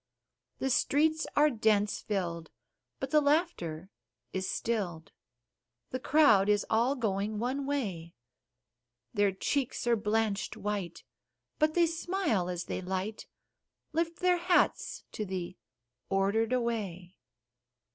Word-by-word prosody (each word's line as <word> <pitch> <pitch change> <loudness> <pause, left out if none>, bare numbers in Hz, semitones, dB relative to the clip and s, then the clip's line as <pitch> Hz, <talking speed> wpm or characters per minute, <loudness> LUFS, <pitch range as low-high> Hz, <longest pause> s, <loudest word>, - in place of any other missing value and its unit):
The 265 - -1
streets 310 +5 +2
are 300 +1 +5
dense 215 -3 +2
filled, 170 -5 -3 0.5
but - - -4
the 305 -1 +5
laughter 245 - 0 0.4
is 190 0 -2
still'd 185 -8 -2 0.8
The 255 - -2
crowd 255 -9 +5
is 205 -1 +3
all 235 +5 +3
going 210 -3 -1
one 260 +5 -2
way; 190 -13 -3 1.0
Their 205 -2 +3
cheeks 250 +8 -1
are 240 -1 +4
blanched 210 -1 -1
white, 200 -4 -4 0.6
but 310 0 +2
they 345 -1 +5
smile 330 - -1
as 175 -1 -3
they - - -4
light 190 +3 -4 0.7
Lift 335 +1 -1
their 360 -1 +4
hats 350 0 +1
to 215 - -4
the 185 -2 -4 0.5
Ordered 200 +4 +1
away. 205 -8 -2
220 Hz, 115 wpm, -30 LUFS, 190-285 Hz, 1.0 s, are